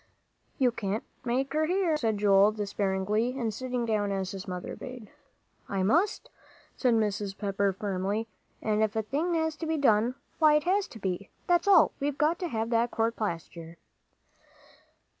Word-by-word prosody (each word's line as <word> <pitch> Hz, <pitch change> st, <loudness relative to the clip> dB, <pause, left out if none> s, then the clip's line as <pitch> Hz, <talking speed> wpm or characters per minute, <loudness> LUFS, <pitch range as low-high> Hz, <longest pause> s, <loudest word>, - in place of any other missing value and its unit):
"You 255 Hz, -2 st, +3 dB
can't 210 Hz, -1 st, -3 dB, 0.2 s
make 265 Hz, +3 st, -1 dB
her 310 Hz, +1 st, +1 dB
hear," 360 Hz, -2 st, +1 dB
said 225 Hz, -7 st, 0 dB
Joel, 200 Hz, 0 st, +5 dB
despairingly, 205 Hz, +3 st, -1 dB
and 230 Hz, -4 st, -1 dB
sitting 250 Hz, +1 st, -2 dB
down 210 Hz, -3 st, 0 dB
as 190 Hz, -1 st, -2 dB
his 195 Hz, 0 st, -7 dB
mother 180 Hz, -1 st, -5 dB
bade. 250 Hz, -4 st, -9 dB, 0.6 s
"I 195 Hz, -1 st, 0 dB
must," 335 Hz, -, +1 dB, 0.4 s
said 250 Hz, -3 st, +2 dB
Mrs. 205 Hz, -2 st, -1 dB
Pepper, 200 Hz, -1 st, 0 dB
firmly; 200 Hz, +3 st, -2 dB, 0.4 s
"and 215 Hz, -1 st, +1 dB
if 220 Hz, 0 st, +1 dB
a 220 Hz, -, 0 dB
thing 315 Hz, -, -1 dB
has 320 Hz, -1 st, 0 dB
to 325 Hz, -, -4 dB
be 320 Hz, 0 st, 0 dB
done, 240 Hz, -3 st, +3 dB, 0.2 s
why 305 Hz, -2 st, +6 dB
it 300 Hz, -, +2 dB
has 385 Hz, +4 st, +1 dB
to 225 Hz, -, -12 dB
be, 190 Hz, 0 st, -3 dB, 0.2 s
that's 350 Hz, +1 st, +2 dB
all; 380 Hz, -5 st, +6 dB
we've 285 Hz, 0 st, -2 dB
got 315 Hz, +3 st, +2 dB
to 360 Hz, -, -2 dB
have 225 Hz, -5 st, -2 dB
that 235 Hz, +1 st, +2 dB
court 225 Hz, 0 st, 0 dB
plaster." 170 Hz, -4 st, -5 dB
225 Hz, 170 wpm, -28 LUFS, 200-285 Hz, 0.6 s, why